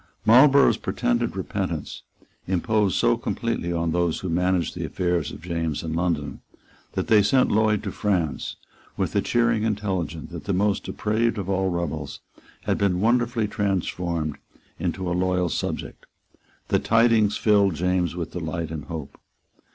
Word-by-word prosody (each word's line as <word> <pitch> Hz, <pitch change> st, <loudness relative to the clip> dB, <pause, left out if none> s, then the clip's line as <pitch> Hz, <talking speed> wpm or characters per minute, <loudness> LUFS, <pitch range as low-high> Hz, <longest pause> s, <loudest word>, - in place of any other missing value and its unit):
Marlborough's 135 Hz, +4 st, +6 dB
pretended -, -, -1 dB
repentance -, -, -4 dB, 0.5 s
imposed 95 Hz, +2 st, +1 dB
so -, -, +3 dB
completely 85 Hz, -, -2 dB
on 85 Hz, -1 st, 0 dB
those 85 Hz, -1 st, 0 dB
who 95 Hz, -, -3 dB
managed 90 Hz, +1 st, +1 dB
the -, -, -5 dB
affairs 85 Hz, -4 st, -1 dB
of -, -, -10 dB
James 85 Hz, -3 st, -2 dB
in 80 Hz, -1 st, -3 dB
London 80 Hz, -5 st, -2 dB, 0.5 s
that -, -, -1 dB
they 110 Hz, -2 st, +5 dB
sent 125 Hz, +6 st, +3 dB
Lloyd 110 Hz, -1 st, +2 dB
to 100 Hz, -, -3 dB
France, 90 Hz, -8 st, -1 dB, 0.4 s
with -, -, -1 dB
the -, -, +2 dB
cheering 120 Hz, -2 st, +2 dB
intelligence 95 Hz, -7 st, -2 dB
that -, -, -8 dB
the 100 Hz, -, 0 dB
most 100 Hz, +1 st, +1 dB
depraved 110 Hz, +2 st, 0 dB
of 95 Hz, -3 st, -4 dB
all 95 Hz, 0 st, +1 dB
rebels 80 Hz, -5 st, -3 dB, 0.4 s
had -, -, 0 dB
been 95 Hz, -3 st, +1 dB
wonderfully 120 Hz, 0 st, +2 dB
transformed 90 Hz, -6 st, -2 dB, 0.4 s
into 95 Hz, -1 st, -2 dB
a 85 Hz, -, 0 dB
loyal 90 Hz, 0 st, +1 dB
subject. -, -, -4 dB, 0.6 s
The -, -, +3 dB
tidings 115 Hz, -2 st, +3 dB
filled 100 Hz, -4 st, +3 dB
James 90 Hz, 0 st, 0 dB
with 85 Hz, -2 st, -4 dB
delight 80 Hz, -2 st, -4 dB
and 80 Hz, -2 st, -5 dB
hope. 80 Hz, -4 st, -7 dB
90 Hz, 150 wpm, -24 LUFS, 85-105 Hz, 0.6 s, Marlborough's